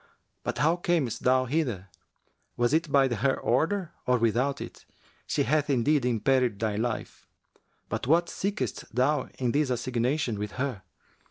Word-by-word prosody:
But - - -3
how 160 +4 +3
camest 175 - 0
thou 130 0 +3
hither? 120 - -2 0.7
Was 120 +3 +2
it 160 -1 +1
by 135 -1 +5
her 130 +2 0
order 165 - 0 0.2
or 125 0 +4
without 125 +5 +1
it? - - -9 0.4
She - - +1
hath 150 +3 +1
indeed 140 +1 +2
imperilled 125 -1 +2
thy 110 -1 -1
life[FN#361]. 115 +2 -3 0.6
But - - -3
what 170 +4 +4
seekest 200 - -4
thou 130 +2 +1
in 125 -2 0
this 145 0 +1
assignation 125 0 -1
with 105 -1 -4
her?' 130 -6 -3
130 Hz, 150 wpm, -27 LUFS, 120-150 Hz, 0.7 s, by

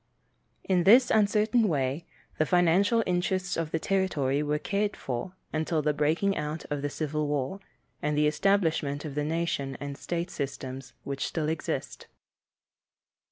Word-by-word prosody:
In 180 -2 +2
this 240 +7 +7
uncertain 215 +2 +3
way, 140 0 -1 0.3
the 155 - +4
financial 185 +7 +4
interests 180 0 0
of 165 -2 -2
the 160 - 0
territory 155 -7 0
were 150 0 0
cared 205 +6 -1
for 125 +7 -4 0.2
until 155 0 0
the 150 0 +2
breaking 160 +7 +1
out 150 +2 -4
of 145 -1 -1
the 145 - -1
Civil 150 0 -2
War, 145 +5 -2 0.4
and 150 0 0
the 150 - +4
establishment 155 -4 +1
of 150 - -5
the 150 +1 -1
national 155 -3 -2
and 140 0 -5
state 170 +4 -3
systems 135 -1 -5
which 140 -1 -3
still 155 -2 -2
exist. 160 0 -4
155 Hz, 150 wpm, -28 LUFS, 145-185 Hz, 0.4 s, this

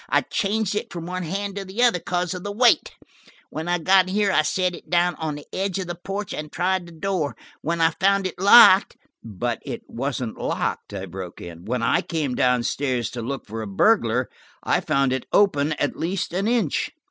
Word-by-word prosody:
I - - +3
changed 210 0 -1
it 210 - -3
from 170 -2 -6
one 185 +1 -4
hand 195 +4 -4
to 200 - -3
the 195 +6 -2
other 235 -7 +4
because 180 +1 -2
of 180 -1 -7
the 205 - -4
weight. 240 +3 +3 0.6
When 160 +2 -5
I 175 0 +1
got 185 +2 +4
here 200 +1 +1
I - - +4
set 180 +3 0
it - - -12
down 175 0 +2
on 155 -2 -3
the 145 - -10
edge 195 -1 -1
of 190 - -3
the 175 - -4
porch 195 +3 -5
and 150 0 -6
tried 185 0 -1
the - - -12
door. 165 -3 -2 0.3
When 170 +2 -2
I 165 0 +4
found 195 +3 +1
it 185 - -4
locked–" 195 0 +7 0.3
"But 115 +2 -3
it - - -6
wasn't 125 -2 -4
locked," - - -2
I 95 - -5
broke 90 -1 -8
in. 85 0 -10
"When 120 +2 -2
I 115 - +2
came 155 -6 -2
down 125 -1 +2
stairs 125 -3 -1
to 120 - -5
look 135 +4 -5
for 110 +2 -6
a 110 - -5
burglar, 125 - +2 0.4
I - - +2
found 135 -1 +1
it 130 - -4
open 155 -7 +3
at 145 -1 -2
least 175 +1 -3
an 195 +4 0
inch." 225 - 0
170 Hz, 215 wpm, -23 LUFS, 130-195 Hz, 0.6 s, locked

